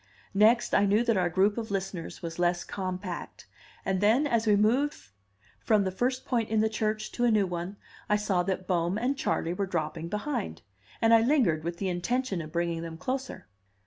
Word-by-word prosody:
Next, 220 +4 +4
I 200 - +4
knew 210 +4 +3
that 230 -2 +2
our 180 -2 +2
group 195 +5 +2
of 225 - -5
listeners 190 -4 -4
was 165 0 -5
less 175 0 +1
compact; 185 -2 -5 0.4
and 190 -1 0
then, 225 +8 +4
as 230 -5 +1
we 210 - +5
moved 245 +8 +2 0.6
from 215 -3 +2
the 190 - -1
first 255 +6 -1
point 230 -3 0
in 220 0 +2
the 220 +1 +3
church 215 0 -2
to 245 - -2
a 240 - +5
new 210 -3 +3
one, 180 +2 -5 0.3
I 210 - +4
saw 205 -3 +1
that 185 0 -2
Bohm 175 +1 0
and 250 +5 0
Charley 170 -10 -1
were 195 +2 -2
dropping 165 -1 -3
behind, 210 - -3 0.4
and 225 0 +6
I 225 - +7
lingered, 225 - +2
with 170 +1 -4
the 195 0 -2
intention 195 +2 -1
of 155 -1 -8
bringing 170 0 -1
them 165 -1 -6
closer. 265 +6 -4
200 Hz, 200 wpm, -28 LUFS, 175-225 Hz, 0.6 s, I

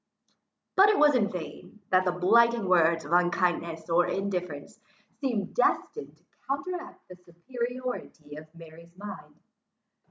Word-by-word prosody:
But 395 +2 +6
it 420 - +3
was 295 -1 +5
in 215 -6 +1
vain, 180 +3 -9
that 185 0 +4
the 180 - +2
blighting 230 +5 +3
winds 165 -3 +3
of 150 - -9
unkindness 175 -2 0
or 175 +1 +2
indifference, 180 -6 -4 0.4
seemed 240 -8 -2
destined 450 -2 -1
to - - -34 0.2
counteract 355 +6 -5
the 180 - -12
superiority 235 - -6
of 155 +1 -10
Mary's 165 +1 -15
mind. 205 +1 -9
180 Hz, 130 wpm, -27 LUFS, 170-240 Hz, 0.4 s, But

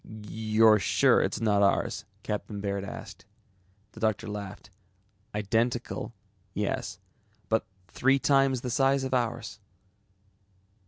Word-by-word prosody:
"You're 110 0 +2
sure 90 - +4
it's - - -1
not 105 -3 +2
ours?" 100 -1 +1 0.2
Captain 105 -1 -4
Baird 100 -1 -2
asked. 100 - -9 0.7
The - - -13
doctor 110 0 0
laughed. 105 -1 -7 0.6
"Identical, 115 +3 -1 0.4
yes, - - -2 0.5
but 110 - +1 0.2
three 135 +2 +2
times 135 -2 +3
the 125 - -3
size 135 +1 +3
of 130 0 -3
ours." 120 -2 -1
110 Hz, 110 wpm, -28 LUFS, 105-125 Hz, 0.7 s, sure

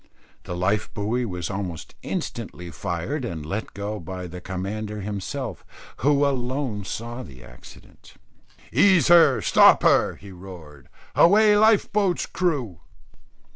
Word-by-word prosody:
The 90 - -5
life 100 +4 0
buoy 115 +5 -1
was 90 -4 -4
almost 90 -6 -5
instantly 85 0 -5
fired 90 - -4
and 80 -10 -5
let 100 +8 -5
go 105 +1 -4
by 90 +2 -7
the 90 +1 -8
commander 105 +3 -5
himself, 100 -1 -5 0.3
who 145 +2 +2
alone 130 -5 -2
saw 120 +4 -5
the 65 - -12
accident. - - -16 0.6
"Ease 185 -7 +4
her! 160 -9 +6
stop - - +6
her!" - - +3
he 100 - -13
roared. 85 -7 -12 0.2
"Away 210 +4 +5
life 215 0 +4
boat's 195 -3 +1
crew!" 140 - -2
105 Hz, 130 wpm, -24 LUFS, 90-140 Hz, 0.6 s, her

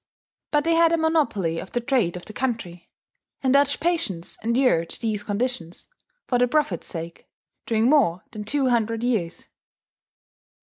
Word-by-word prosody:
But 295 -1 +2
they 330 +1 +2
had 330 0 +5
a 335 - +3
monopoly 285 - +1
of - - -9
the 245 - +1
trade 235 -9 0
of 175 - -10
the 215 - -10
country; 215 -9 -4 0.5
and 260 -1 +3
Dutch 285 0 +3
patience 325 - -1
endured 235 -8 +2
these 220 -3 -1
conditions, 205 -5 -3 0.4
for 245 - +1
the 250 - +4
profit's 245 - 0
sake, 165 0 -7 0.4
during 225 0 +2
more 255 - +3
than 215 -1 -6
two 265 +5 0
hundred 230 -1 0
years. 215 -9 -1
235 Hz, 150 wpm, -24 LUFS, 185-275 Hz, 0.5 s, had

